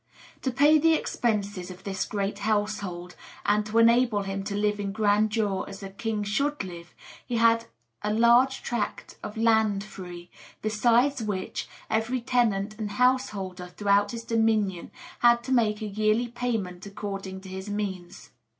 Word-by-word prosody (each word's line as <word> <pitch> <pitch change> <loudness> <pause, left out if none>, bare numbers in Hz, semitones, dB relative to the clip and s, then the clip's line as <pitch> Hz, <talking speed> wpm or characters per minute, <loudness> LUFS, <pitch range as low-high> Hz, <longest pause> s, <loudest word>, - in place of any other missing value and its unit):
To 265 - 0
pay 290 +5 +5
the 325 +1 +4
expenses 205 - -1
of 185 +1 -11
his 195 -1 -2
great 200 0 -3
household, 200 -4 -2 0.3
and 210 +1 +3
to 220 +1 -1
enable 230 -2 +4
him 195 0 -4
to 200 0 -3
live 210 0 0
in 200 -1 -2
grandeur 210 -1 +1
as 195 0 -9
a 195 - -7
king 215 +1 -2
should 280 +6 0
live, 175 -2 -10 0.3
he 240 - -2
had 230 0 +4 0.4
a 210 - -1
large 235 +4 +4
tract 235 -3 -3
of 210 - -7
land 220 -3 +3
free, 180 -4 -10 0.3
besides 235 +5 +3
which, 200 -4 -3 0.2
every 225 +4 0
tenant 220 -3 0
and 205 -2 -3
householder 205 -7 0
throughout 200 +2 +2
his 230 +1 -6
dominion 220 -5 +1 0.3
had 235 0 +5
to 260 - -5
make 220 -4 +2
a - - -2
yearly 215 +3 +1
payment 220 -7 -3
according 195 -2 -6
to 190 - -11
his 190 +2 -6
means. 195 -4 -5
210 Hz, 155 wpm, -27 LUFS, 195-230 Hz, 0.4 s, pay